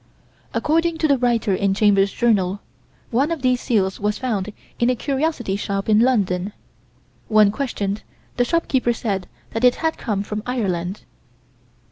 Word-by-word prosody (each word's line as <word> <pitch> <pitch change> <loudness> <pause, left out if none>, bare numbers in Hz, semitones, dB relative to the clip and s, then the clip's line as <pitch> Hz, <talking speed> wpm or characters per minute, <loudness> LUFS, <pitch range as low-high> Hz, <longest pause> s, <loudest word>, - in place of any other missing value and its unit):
According 330 +2 +1
to 320 - +1
the 280 -3 +3
writer 235 -5 +1
in 195 +1 +1
Chambers' 200 -1 +3
Journal, 200 -5 +1 0.5
one 265 +6 +2
of 330 -5 -3
these 255 -1 +2
seals 195 -6 0
was 210 0 0
found 215 -6 -2 0.3
in 240 - +3
a 255 - +2
curiosity 270 -5 -1
shop 200 -1 -3
in 215 -1 +5
London. 205 -6 +1 0.7
When 215 -2 +5
questioned, 210 -5 -3 0.3
the 245 - +2
shopkeeper 260 -5 +1
said 195 -6 -3 0.2
that 225 - -3
it 250 -1 +6
had 320 -1 -2
come 205 -5 -1
from 210 +1 -4
Ireland. 195 -6 -2
220 Hz, 150 wpm, -21 LUFS, 200-255 Hz, 0.7 s, it